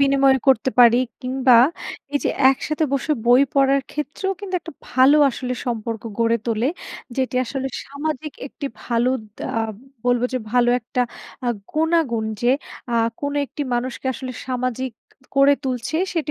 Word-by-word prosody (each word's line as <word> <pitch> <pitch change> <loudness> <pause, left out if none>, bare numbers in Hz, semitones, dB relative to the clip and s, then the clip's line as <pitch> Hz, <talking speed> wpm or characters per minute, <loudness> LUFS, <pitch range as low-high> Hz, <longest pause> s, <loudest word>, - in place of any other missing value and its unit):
বিনিময় 275 -1 +4
করতে 260 -1 +4
পারি। 240 0 +7 0.2
কিংবা 255 -1 +4 0.5
এই 285 - +2
যে, - - +2 0.2
একসাথে 305 +3 -1
বসে 275 +3 +1
বই 250 +3 +7
পড়ার 275 0 +4
ক্ষেত্রেও 300 +7 -3
কিন্তু 380 -2 -5
একটা 335 - -10 0.2
ভালো 260 +3 +6
আসলে 250 0 -4
সম্পর্ক 230 -2 -3 0.2
গড়ে 230 0 +3
তোলে, 230 +1 +1 0.5
যেটি 260 -1 -1
আসলে 265 +2 -3 0.2
সামাজিক 295 0 -4
একটি 280 - -6 0.2
ভালো 240 +1 +1 0.3
দা - - -5
আ - - +1 0.4
বলব 245 -1 +2
যে, 255 - 0
ভালো 245 -1 +4
একটা 245 +2 -3 0.5
আ - - +2 0.2
গুণাগুণ 315 -8 +1 0.2
যে, 240 - +4 0.4
আ - - +1 0.3
কোন 285 0 -2
একটি 290 - -5
মানুষকে 250 +2 -3
আসলে 255 +1 -6
সামাজিক 255 0 -2 0.4
করে 275 +1 +6
তুলছে 255 +3 -2 0.2
সেটি 320 -3 -1
260 Hz, 150 wpm, -22 LUFS, 245-280 Hz, 0.5 s, পারি